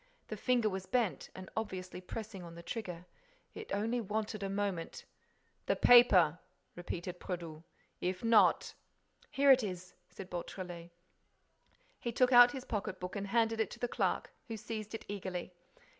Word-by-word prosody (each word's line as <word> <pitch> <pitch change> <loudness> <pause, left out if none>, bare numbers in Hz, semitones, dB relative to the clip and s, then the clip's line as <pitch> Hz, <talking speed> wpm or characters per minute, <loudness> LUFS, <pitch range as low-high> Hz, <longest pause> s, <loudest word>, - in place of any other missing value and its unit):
The - - -3
finger 245 -3 +2
was 190 -2 -3
bent 225 - 0
and 185 0 -8
obviously 185 -4 -4
pressing 205 0 -7
on 170 -1 -10
the 170 - -10
trigger. 180 -3 -6 0.5
It 440 -1 -9
only 230 +4 0
wanted 215 0 -3
a 195 - -2
moment— 195 -4 -3 0.6
"The - - +3
paper," 185 -10 +6 0.4
repeated 175 0 -5
Brédoux. 165 -4 -6 0.4
"If 180 +2 -2
not—" 230 -1 +4 0.6
"Here 280 0 +5
it 260 -1 +7
is," 180 -4 -6 0.2
said 185 +1 -10
Beautrelet. 175 -1 -6 1.1
He 235 - -3
took 255 +2 +3
out 245 0 +10
his 265 -2 -7
pocket 200 -3 -3
book 180 +2 -6
and 200 0 -3
handed 225 +1 +1
it 220 - +1
to - - -10
the 245 - -1
clerk, - - -1 0.2
who 225 -2 -5
seized 215 0 -6
it - - -8
eagerly. 185 -3 -5
200 Hz, 160 wpm, -33 LUFS, 180-230 Hz, 1.1 s, out